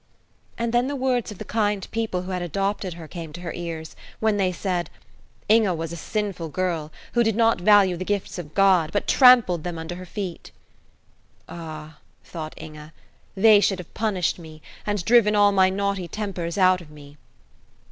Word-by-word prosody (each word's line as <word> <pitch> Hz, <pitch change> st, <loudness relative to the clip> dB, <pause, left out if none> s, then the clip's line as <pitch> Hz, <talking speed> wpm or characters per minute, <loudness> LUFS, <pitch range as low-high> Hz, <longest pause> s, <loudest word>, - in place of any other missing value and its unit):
And 235 Hz, 0 st, -2 dB
then 240 Hz, +1 st, +2 dB
the 285 Hz, -, -3 dB
words 255 Hz, -4 st, 0 dB
of 210 Hz, -, -9 dB
the -, -, -7 dB
kind 205 Hz, -3 st, -1 dB
people 220 Hz, -5 st, -2 dB
who 185 Hz, -, -6 dB
had 180 Hz, -1 st, -2 dB
adopted 195 Hz, +1 st, -2 dB
her 165 Hz, -2 st, -10 dB
came 165 Hz, -2 st, -8 dB
to 175 Hz, -, -8 dB
her 170 Hz, -2 st, -5 dB
ears, 165 Hz, -2 st, -6 dB, 0.2 s
when 220 Hz, -2 st, +1 dB
they 190 Hz, -2 st, +1 dB
said, 180 Hz, -2 st, -2 dB, 0.6 s
"Inge 215 Hz, -5 st, +3 dB
was 165 Hz, 0 st, -4 dB
a -, -, -5 dB
sinful 190 Hz, -2 st, -3 dB
girl, 165 Hz, -2 st, -2 dB, 0.2 s
who 240 Hz, -, +3 dB
did 225 Hz, -2 st, +1 dB
not 225 Hz, -4 st, +2 dB
value 195 Hz, -2 st, +5 dB
the 180 Hz, -, -4 dB
gifts 200 Hz, -1 st, -3 dB
of 155 Hz, -3 st, -9 dB
God, 185 Hz, -5 st, +4 dB
but 205 Hz, -, -1 dB
trampled 240 Hz, -, +6 dB
them 175 Hz, -2 st, -4 dB
under 160 Hz, +2 st, -6 dB
her 180 Hz, +1 st, -8 dB
feet." 185 Hz, -3 st, -6 dB, 1.0 s
"Ah," 155 Hz, -2 st, -9 dB, 0.2 s
thought 155 Hz, -2 st, -7 dB
Inge, 150 Hz, -1 st, -10 dB, 0.5 s
"they 210 Hz, +1 st, +6 dB
should 200 Hz, -1 st, +1 dB
have 180 Hz, -3 st, -11 dB
punished 200 Hz, -6 st, -1 dB
me, 155 Hz, -2 st, -12 dB, 0.2 s
and 205 Hz, -4 st, -1 dB
driven 220 Hz, -1 st, +5 dB
all 205 Hz, 0 st, +5 dB
my 190 Hz, -1 st, +4 dB
naughty 200 Hz, -1 st, -2 dB
tempers 185 Hz, -3 st, -4 dB
out 185 Hz, -1 st, +4 dB
of 165 Hz, -, -14 dB
me." 145 Hz, -1 st, -14 dB
185 Hz, 185 wpm, -24 LUFS, 170-210 Hz, 1.0 s, trampled